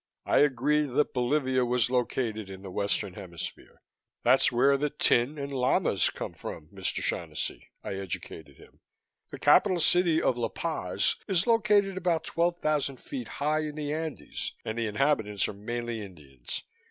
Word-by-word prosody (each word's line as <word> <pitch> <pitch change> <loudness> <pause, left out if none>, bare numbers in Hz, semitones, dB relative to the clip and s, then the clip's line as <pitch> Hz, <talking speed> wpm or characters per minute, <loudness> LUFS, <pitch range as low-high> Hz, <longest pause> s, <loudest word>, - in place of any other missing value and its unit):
I - - +3
agreed 145 +2 +3
that 150 +2 +2
Bolivia 130 0 +1
was 125 -1 +1
located 115 -4 -1
in 95 0 -9
the 95 - -7
Western 100 0 -1
Hemisphere. 85 -2 -8 0.4
"That's 130 +2 +5
where 135 +4 +4
the 145 +2 0
tin 140 0 +2
and 140 0 -5
llamas 130 - +2
come - - -6
from, 75 -1 -8
Mr. 95 -2 -3
Shaughnessy," - - -3
I - - -4
educated 80 -6 -7
him. - - -18 0.5
"The - - -7
capital 185 -4 +5
city 170 -1 +4
of 125 - +1
La 120 - -1
Paz 100 - -1
is 190 -2 +2
located 210 -4 +3
about 175 -3 +1
twelve 170 +1 0
thousand 150 -4 0
feet 265 - -6
high 150 +2 0
in 155 -1 -3
the 150 -1 -3
Andes 160 -1 -4
and 110 - -3
the 115 - 0
inhabitants 110 -4 +1
are - - -5
mainly 120 +2 -4
Indians. 75 -11 -8
130 Hz, 160 wpm, -28 LUFS, 105-155 Hz, 0.5 s, That's